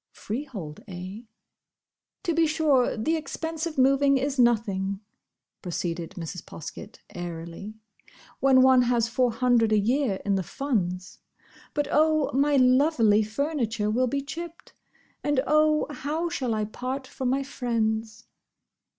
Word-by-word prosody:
Freehold, 210 - -6
eh? 185 +3 -7 1.0
"To 345 -4 0
be 325 0 +3
sure, 300 -7 +2
the 275 +10 0
expense 320 +1 -4
of 315 - -7
moving 275 +1 +4
is 275 +1 -2
nothing," 200 -5 +1 0.6
proceeded 170 -2 -4
Mrs. 170 +1 -6
Poskett, 165 - -9 0.2
airily, 175 +4 -7 0.6
"when 265 -1 +5
one 260 -1 +6
has 240 -2 +2
Four 240 +2 +1
hundred 235 -2 +2
a 215 - +4
year 225 -1 +1
in 200 - +1
the 195 - +1
Funds. 185 - -3 0.6
But 290 -1 0
oh! 310 -1 +3
my 285 +2 +3
lovely 255 -4 +4
furniture 225 -2 -1
will 255 +3 +2
be 275 +3 -2
chipped! 335 +4 -8 0.5
and, 290 -2 +1
oh! 305 0 +3
how 310 +4 -2
shall 250 -8 -2
I 215 -1 -1
part 255 +5 -5
from 260 -1 -3
my 270 +2 +1
friends?" 225 -4 -2
250 Hz, 135 wpm, -26 LUFS, 210-285 Hz, 1.0 s, one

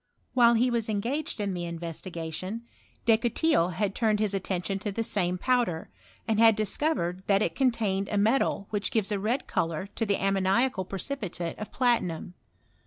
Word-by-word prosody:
While 235 -2 +6
he 245 +2 +3
was 230 -2 -1
engaged 240 +9 -2
in 200 -2 -1
the 175 -1 -3
iavestigatioa, 170 +4 -5 0.4
Descotils 230 - +3
had 195 +3 -1
turned 220 -2 +2
biis 210 -1 0
atten 190 -2 -2
tion 195 +3 -1
to 205 +1 -3
the 225 +3 -2
same 180 -4 0
powder, 235 -7 0 0.4
and 220 -1 +1
had 225 -1 +7
discovered 210 - 0
that 200 +1 +4
it - - -1
contained 220 -7 0
a 210 - -1
metal 215 -1 +2
which 205 -1 -1
gives 220 -2 0
a 205 - 0
red 235 +7 -1
colour 165 +2 -1
to - - -2
the 200 - +2
ammoniaca! 195 +3 +1
precipitate 190 - -4
of 215 - -6
platinum. 190 -9 0
205 Hz, 170 wpm, -28 LUFS, 185-230 Hz, 0.4 s, had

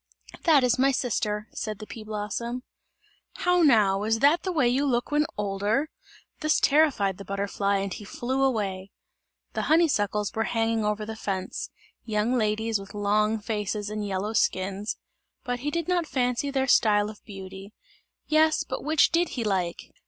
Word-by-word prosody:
"That 305 -6 +6
is 250 0 +2
my 270 +1 +5
sister," 215 -4 -1
said 215 -2 -4
the 215 - -8
pea 220 0 -9
blossom. 220 +4 -4 0.7
"How 360 0 +2
now, 210 -10 +4
is 220 +2 +1
that 290 +8 +4
the 375 - -2
way 300 -8 +2
you 255 +4 +2
look 245 -3 0
when 300 0 +2
older?" 210 +9 0 0.5
This 310 0 +2
terrified 275 - +3
the - - -6
butterfly 200 0 -1
and 195 -1 -2
he 210 - -8
flew 255 +6 -3
away. 200 -7 0 0.6
The - - -1
honeysuckles 210 - +2
were 225 0 0
hanging 225 -1 0
over 210 0 -1
the 220 +1 -6
fence 195 -4 -4 0.3
young 215 +2 0
ladies 220 -1 0
with 195 +1 -11
long 210 +2 +1
faces 210 -1 -3
and 215 0 -3
yellow 200 +2 -2
skins 195 0 0 0.5
but 245 -2 -3
he 285 +4 -2
did 335 +1 -2
not 350 -3 +1
fancy 250 +1 0
their 270 -1 0
style 210 -4 +4
of 210 - -17
beauty. 195 -1 -9 0.5
Yes, 310 0 +3
but - - -5
which 310 +1 +3
did 340 0 +2
he 235 - 0
like? 185 -5 -2
220 Hz, 165 wpm, -26 LUFS, 205-270 Hz, 0.7 s, That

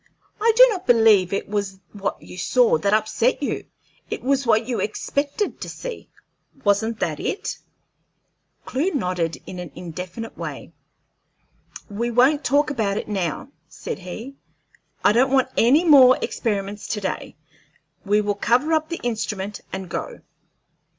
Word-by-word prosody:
"I 455 +2 +4
do - - +10
not 370 -4 -5
believe 220 -6 +5
it 195 - -2
was 200 -2 -3
what 200 -1 -3
you - - -11
saw 230 -1 +3
that 200 +5 +1
upset 220 +5 +1
you; - - -3 0.4
it - - -5
was 270 0 +1
what 225 +1 +3
you 240 -4 -1
expected 280 - -2
to - - -5
see - - -7 0.5
wasn't 220 +2 +1
that 155 -3 -1
it?" 420 +2 -3 1.1
Clewe 310 +7 -1
nodded 180 - -1
in 180 - -8
an 175 -3 -7
indefinite 180 +6 -7
way. - - -7 1.1
"We 225 +4 -2
won't 260 +6 +3
talk 290 +1 +2
about 210 -7 -1
it - - -4
now," 185 -10 -3 0.2
said - - -6
he. 220 +9 -8 0.7
"I - - +6
don't 255 +4 +3
want 265 -1 +3
any 280 +9 +4
more 265 -5 +8
experiments 205 -2 -3
to 210 - -2
day. 190 - -4 0.7
We 210 +1 +2
will 205 0 0
cover 250 +9 +1
up 315 0 +1
the 335 - -5
instrument 210 -4 -3
and 190 -1 -5
go." 475 - -5
225 Hz, 150 wpm, -22 LUFS, 200-275 Hz, 1.1 s, do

